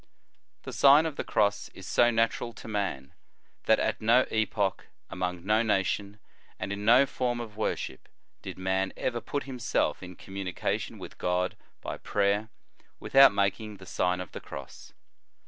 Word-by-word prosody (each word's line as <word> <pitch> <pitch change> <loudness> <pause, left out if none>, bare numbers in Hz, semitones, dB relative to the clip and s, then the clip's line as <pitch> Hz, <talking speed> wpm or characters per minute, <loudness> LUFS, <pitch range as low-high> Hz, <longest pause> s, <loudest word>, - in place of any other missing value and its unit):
The - - -7
Sien 145 +3 +6
of 160 -3 -3
the - - -3
Cross 100 -1 +1
is 95 - -10
so 120 +4 +4
natural 115 +1 0
to - - -11
man, 95 -10 -3
o - - -38 0.5
that - - +5
at - - -1
no 120 +4 +5
epoch, 105 -3 0 0.2
among 90 -1 -3
no 110 +2 +3
nation, 100 -1 0 0.4
and 100 - -4
in 100 0 -5
no 120 +5 +6
form 125 -2 -2
of 110 -3 -7
worship, 105 -10 -3 0.3
did - - -7
man 95 +1 -1
ever 120 -2 -2
put 145 +4 -3
himself 125 -3 -1
in 90 0 -9
communication 95 0 -4
with - - -10
God 90 +1 0 0.3
by - - -5
prayer, 100 +1 0 0.5
without 135 0 +7
making 100 +2 -1
the 95 - -13
Sign 90 0 0
of 90 -3 -7
the - - -8
Cross. 70 -1 -10
105 Hz, 165 wpm, -28 LUFS, 95-115 Hz, 0.5 s, without